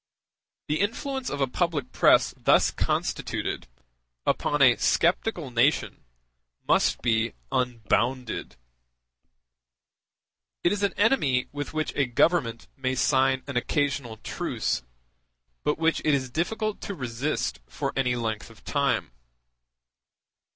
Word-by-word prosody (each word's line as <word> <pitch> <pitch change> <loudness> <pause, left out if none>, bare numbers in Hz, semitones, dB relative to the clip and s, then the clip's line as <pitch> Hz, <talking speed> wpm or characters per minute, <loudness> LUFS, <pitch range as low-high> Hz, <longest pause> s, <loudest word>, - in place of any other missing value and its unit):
The 150 +1 0
influence 265 +6 -2
of 140 - -3
a - - +4
public 160 +1 -1
press - - +4
thus - - +4
constituted, - - -2 0.6
upon 150 - +1
a 125 -4 +7
sceptical 170 - +1
nation, 120 0 +1 0.6
must - - +2
be 115 -1 +1 0.2
unbounded. 125 0 -1 2.1
It 175 - +4
is 205 0 -1
an 200 -2 +1
enemy 150 - +2
with 145 +2 -5
which 155 0 -1
a 140 -2 +2
Government 120 -2 +1
may 130 -1 -1
sign 130 0 +2
an 140 -3 -3
occasional 140 -4 -1
truce, - - -2 0.8
but 150 - +1
which 165 +1 +2
it 150 -2 +3
is 130 -2 -3
difficult 215 - -2
to 200 - -5
resist 130 - -2
for - - -3
any 125 -2 +1
length 110 -2 -3
of 115 -1 -17
time. 140 - 0
135 Hz, 115 wpm, -26 LUFS, 125-165 Hz, 2.1 s, a